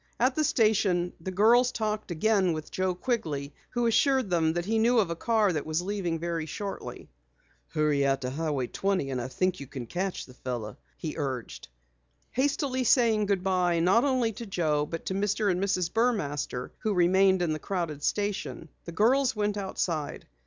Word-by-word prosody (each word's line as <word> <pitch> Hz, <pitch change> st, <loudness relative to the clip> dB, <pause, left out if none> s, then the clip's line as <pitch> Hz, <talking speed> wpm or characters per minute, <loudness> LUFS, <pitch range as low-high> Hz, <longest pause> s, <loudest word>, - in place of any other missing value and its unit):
At 255 Hz, +2 st, +3 dB
the 310 Hz, -, +1 dB
station 200 Hz, -9 st, +2 dB
the 190 Hz, -, -4 dB
girls 235 Hz, +6 st, +4 dB
talked 215 Hz, -2 st, -2 dB
again 185 Hz, +1 st, +2 dB
with 155 Hz, -1 st, -6 dB
Joe 185 Hz, -1 st, 0 dB
Quigley 155 Hz, -, -2 dB, 0.2 s
who 240 Hz, 0 st, -1 dB
assured 255 Hz, -1 st, +2 dB
them 165 Hz, -2 st, +2 dB
he 205 Hz, +6 st, 0 dB
knew 240 Hz, +2 st, +3 dB
of 195 Hz, -7 st, +2 dB
a -, -, -2 dB
car 215 Hz, 0 st, +2 dB
that 150 Hz, -, -2 dB
was 155 Hz, +1 st, 0 dB
leaving 185 Hz, -4 st, -2 dB
very 165 Hz, -1 st, -3 dB
shortly. 195 Hz, +6 st, -6 dB, 0.6 s
"Hurry 150 Hz, -3 st, +1 dB
out 135 Hz, -1 st, +1 dB
to 125 Hz, 0 st, -3 dB
Highway 145 Hz, -3 st, -1 dB
20 185 Hz, -1 st, -1 dB
and 130 Hz, -2 st, -2 dB
I 120 Hz, -, -4 dB
think 185 Hz, +8 st, -1 dB
you 140 Hz, -, -8 dB
can 130 Hz, -2 st, -7 dB
catch 180 Hz, +9 st, -3 dB
the 130 Hz, -, -15 dB
fellow," 120 Hz, -5 st, -5 dB, 0.2 s
he 155 Hz, -, -4 dB
urged. 130 Hz, -, -4 dB, 0.6 s
Hastily 270 Hz, -1 st, 0 dB
saying 225 Hz, -4 st, +3 dB
goodbye 185 Hz, -3 st, +1 dB
not 185 Hz, +7 st, +4 dB
only 255 Hz, -5 st, +2 dB
to 230 Hz, +2 st, -8 dB
Joe 155 Hz, -6 st, 0 dB
but 165 Hz, +1 st, -6 dB
to -, -, -2 dB
Mr. 205 Hz, +1 st, +1 dB
and 180 Hz, +2 st, -1 dB
Mrs. 185 Hz, -3 st, 0 dB
Burmaster 150 Hz, -, -1 dB
who 215 Hz, -2 st, -1 dB
remained 190 Hz, +1 st, +4 dB
in 160 Hz, -3 st, 0 dB
the 155 Hz, -, -4 dB
crowded 170 Hz, -5 st, -3 dB
station, 205 Hz, -3 st, -2 dB, 0.2 s
the 170 Hz, -, -6 dB
girls 250 Hz, +8 st, +3 dB
went 210 Hz, -1 st, 0 dB
outside. 170 Hz, -6 st, -3 dB
185 Hz, 180 wpm, -28 LUFS, 155-215 Hz, 0.6 s, girls